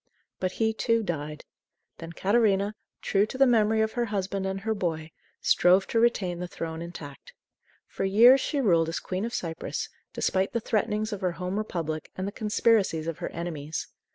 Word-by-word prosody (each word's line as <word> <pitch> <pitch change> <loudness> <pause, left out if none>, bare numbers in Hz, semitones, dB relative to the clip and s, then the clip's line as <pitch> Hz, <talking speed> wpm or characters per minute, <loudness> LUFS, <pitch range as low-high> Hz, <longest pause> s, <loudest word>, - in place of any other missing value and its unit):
But 185 0 -1
he, 220 -1 +1
too, 230 0 +1
died. 150 -4 -4 0.5
Then 165 0 -7
Catarina, 200 +1 +2 0.3
true 200 +1 +2
to 260 - -7
the 270 - +6
memory 220 -3 +3
of 220 0 +1
her 240 0 -1
husband 195 -2 -2
and 190 0 -3
her 220 +2 0
boy, 160 -5 -3 0.3
strove 185 +2 +4
to 230 - +2
retain 195 -7 +1
the 180 - -4
throne 165 -1 -5
intact. 165 -5 -9 0.5
For - - -5
years 235 +7 +7
she 290 - -1
ruled 170 -10 +3
as 165 - -2
Queen 185 +3 -3
of 235 - -5
Cyprus, 165 -5 -4 0.2
despite 190 0 0
the 235 - +1
threatenings 215 0 -1
of 200 - -5
her 180 -2 0
home 180 +3 -4
Republic 165 -7 -4
and 185 +1 -3
the - - -3
conspiracies 210 -6 +1
of 165 -2 -4
her - - -3
enemies. 160 -3 -5
195 Hz, 180 wpm, -27 LUFS, 170-220 Hz, 0.5 s, years